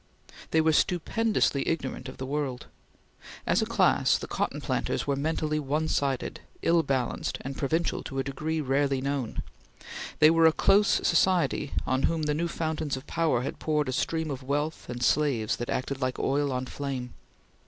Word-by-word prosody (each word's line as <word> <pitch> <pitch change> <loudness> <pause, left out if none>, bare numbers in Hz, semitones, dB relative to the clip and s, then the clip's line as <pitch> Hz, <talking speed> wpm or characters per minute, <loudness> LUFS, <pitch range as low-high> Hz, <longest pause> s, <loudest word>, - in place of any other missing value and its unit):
They 160 - +3
were 160 0 +3
stupendously 180 -2 +1
ignorant 155 -5 -2
of - - -10
the 130 - -4
world. 135 -2 -3 0.8
As - - +2
a - - 0
class, - - +3
the - - -6
cotton - - -2
planters - - -1
were 140 - +1
mentally 155 +1 -1
one 150 +2 -1
sided, 135 -4 -1 0.2
ill 170 0 +4
balanced, 135 -5 -1
and 135 +1 -5
provincial 160 +5 0
to 135 - -6
a 135 - +1
degree 155 +4 -2
rarely 135 0 +1
known. 135 -3 -2 0.7
They 155 +1 +7
were 165 0 +6
a 160 - +4
close 200 +4 +4 0.2
society 170 -4 +2
on 130 0 +1
whom 165 -1 -1
the 150 0 +1
new 165 +3 0
fountains 155 -4 -2
of 130 - -9
power 155 -8 +1
had - - -5
poured 150 -3 0
a - - -1
stream 160 +3 -1
of 135 -1 -5
wealth 145 +4 -2
and 120 0 -4
slaves 135 -8 +2
that 120 - -5
acted 135 +1 -2
like 130 -1 -1
oil 140 +1 +1
on 125 0 -2
flame. 130 -2 -5
145 Hz, 175 wpm, -28 LUFS, 135-160 Hz, 0.8 s, They